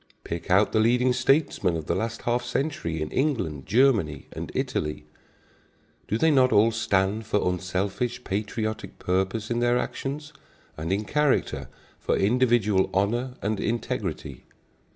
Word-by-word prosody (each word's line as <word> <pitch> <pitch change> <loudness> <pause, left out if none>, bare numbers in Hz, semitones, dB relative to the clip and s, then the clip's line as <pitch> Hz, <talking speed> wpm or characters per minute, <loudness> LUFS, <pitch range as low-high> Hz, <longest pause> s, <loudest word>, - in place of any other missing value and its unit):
Pick 85 +2 -5
out 100 +3 +4
the 110 - +2
leading 125 +3 +3
statesmen 125 - +2
of 80 - -6
the - - 0
last 115 0 -3
half 120 +1 0
century 120 - -2
in 75 - -6
England, 115 - -1
Germany 110 - +2
and - - -6
Italy. 75 0 -2 1.0
Do 110 - 0
they 160 +6 +3
not 130 -3 +4
all 110 +2 +5
stand 105 -1 0
for 105 -3 +1
unselfish, 95 +7 -2
patriotic 110 +2 -3
purpose 95 +5 -1
in 120 - +1
their 120 0 +3
actions, 145 +4 -4 0.4
and 80 +3 -4
in 100 +2 0
character 150 +3 0 0.3
for - - 0
individual 110 -3 +3
honor 120 +6 0
and 105 +1 -1
integrity? 95 - -3
110 Hz, 140 wpm, -26 LUFS, 95-125 Hz, 1.0 s, all